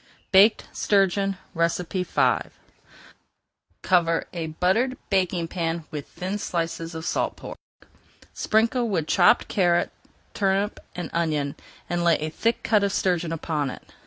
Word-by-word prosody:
BAKED 200 +3 +6
STURGEON 195 -1 +1 0.2
V 175 +2 +1 1.4
Cover 170 -3 +2
a 165 -2 -3
buttered 190 +11 +1
baking 185 -3 +1
pan 165 -2 -3
with 150 -2 -6
thin 190 +3 -4
slices 165 -2 -3
of 160 +1 -5
salt 180 - -1
pork. - - -8 0.8
Sprinkle 230 +2 +1
with 170 -7 0
chopped 175 +2 +4
carrot, 175 -3 +2 0.4
turnip, 195 +1 0 0.2
and 175 - -5
onion, 150 -4 0 0.3
and 175 0 -1
lay 170 -1 +5
a 155 +1 -4
thick 230 +8 -1
cut 210 -2 +3
of 200 - +1
sturgeon 175 -4 0
upon 155 -3 -2
it. - - -11
175 Hz, 130 wpm, -25 LUFS, 165-195 Hz, 1.4 s, BAKED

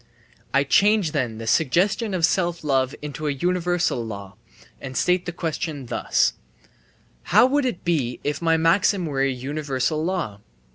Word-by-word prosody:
I 140 - +3
change 200 +3 +3
then 125 -7 -2
the 115 - -7
suggestion 185 - +1
of 170 -3 +3
self 170 0 -1
love 135 -3 +1
into 150 +1 -5
a - - +1
universal 175 -2 0
law, 100 -3 -8 0.5
and 130 -1 -6
state 180 0 +1
the - - -1
question 160 -4 -4
thus: - - +1 0.9
"How 215 +6 +5
would 280 +1 +1
it 240 -9 -3
be 140 -8 0
if 145 +1 -2
my 165 -1 +3
maxim 175 +3 +2
were 140 -4 -2
a 135 - +2
universal 140 +2 -2
law?" 170 - -2
155 Hz, 155 wpm, -23 LUFS, 135-180 Hz, 0.9 s, How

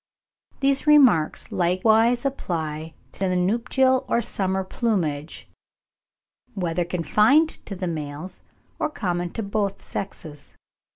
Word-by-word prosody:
These 275 +1 +1
remarks 255 - +4
likewise 220 +8 +2
apply 160 - -3 0.2
to 190 -1 -2
the 180 - 0
nuptial 250 +7 +2
or - - +2
summer 190 -4 -1
plumage, 170 - -2 1.1
whether 175 -2 -1
confined 215 - +2
to 200 - -5
the 185 0 -4
males, 155 +1 -4 0.4
or - - 0
common 175 -9 -2
to 225 - -3
both 200 -1 -2
sexes. 155 -6 -7
190 Hz, 110 wpm, -24 LUFS, 170-235 Hz, 1.1 s, remarks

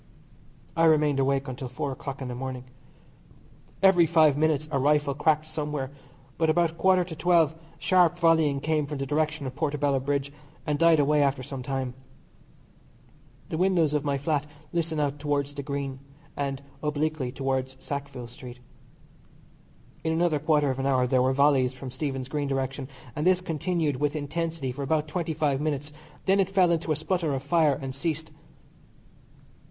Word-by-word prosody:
I 165 0 +4
remained 150 -3 +4
awake 135 +1 +1
until 130 +1 -5
four 130 +3 -3
o'clock 135 0 -6
in - - -4
the 125 - -4
morning. 130 0 -5 1.2
Every 180 -3 +6
five 155 -3 +5
minutes 155 0 +1
a 140 - +1
rifle 145 +1 +2
cracked 155 +2 +1
somewhere, 150 -3 -3 0.5
but 160 -1 +3
about 170 0 +3
a - - -16
quarter 185 +2 +3
to 170 -2 -8
twelve 165 -2 +3 0.2
sharp 175 -2 +3
volleying 160 -5 +3
came 155 -1 0
from 150 0 -4
the 135 - -2
direction 155 +1 -1
of 130 -1 -5
Portobello 145 -2 0
Bridge, 140 +1 -2 0.3
and 150 -1 -1
died 165 -2 +5
away 145 +1 +3
after 140 -2 +1
some 135 +1 -6
time. 130 -1 -3 1.6
The 160 - -3
windows 175 -5 +3
of 150 -2 +1
my 140 -2 0
flat 150 0 -1 0.3
listen 165 -2 -1
out 145 -1 -1
towards 145 -1 -1
the 145 - -5
Green, 140 -1 -4 0.4
and 140 -1 -3 0.2
obliquely 150 -3 -1
towards 130 0 -2
Sackville 140 -3 -5
Street. 125 +1 -10 1.5
In 160 - 0
another 160 -2 +2
quarter 150 -2 +2
of 130 - -4
an 135 - 0
hour 130 -2 +3
there 125 0 +2
were 130 +1 +3
volleys 135 -2 +3
from 130 0 -8
Stephen's 135 -1 -3
Green 145 0 -2
direction, 135 0 -2 0.3
and 150 +4 0
this 185 -1 +5
continued 165 -4 -1
with 145 +2 0
intensity 155 -1 -3
for 135 +3 -7
about 150 +2 0
twenty 165 0 -3
five 145 -3 +1
minutes. 150 -1 -2 0.3
Then 195 +1 +3
it 190 -1 +2
fell 185 -3 +4
into 165 -1 0
a - - +3
sputter 160 -1 -1
of 135 - -4
fire 150 -2 +3
and 135 -2 -5
ceased. 160 +2 -3
145 Hz, 170 wpm, -27 LUFS, 135-160 Hz, 1.6 s, Every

